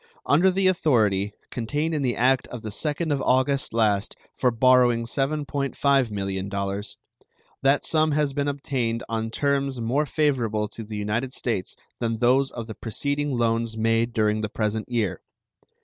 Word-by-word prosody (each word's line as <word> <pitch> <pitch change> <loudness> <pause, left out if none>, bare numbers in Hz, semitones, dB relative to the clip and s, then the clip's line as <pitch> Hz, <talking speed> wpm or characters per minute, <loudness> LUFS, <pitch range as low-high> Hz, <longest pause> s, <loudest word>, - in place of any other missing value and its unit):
Under 175 +6 +4
the 190 +1 0
authority 110 - +2 0.2
contained 145 +7 -2
in 150 - 0
the 125 -3 0
act 130 +2 +2
of 120 -3 -8
the 110 - -5
2nd 150 +6 -1
of 140 - -1
August 135 +2 +1
last 110 -2 +1 0.2
for 125 - +2
borrowing 120 -1 +4
$7.5 140 -1 0
millions, 100 0 -3 0.6
that 135 +1 +3
sum 155 -1 +2
has 145 -2 +1
been 145 0 -1
obtained 130 -5 -2
on 115 0 -2
terms 140 +1 0
more 130 +6 0
favorable 120 -9 0
to 115 - -8
the 105 0 -6
United 110 +5 -2
States 105 -7 -3 0.2
than 115 -1 -1
those 130 +4 +3
of 115 -2 -6
the 110 - -7
preceding 140 +5 -2
loans 115 -1 0
made 115 +1 +1
during 110 -1 +1
the 105 - -2
present 110 +1 -2
year. 115 -6 -1
120 Hz, 155 wpm, -25 LUFS, 110-140 Hz, 0.6 s, Under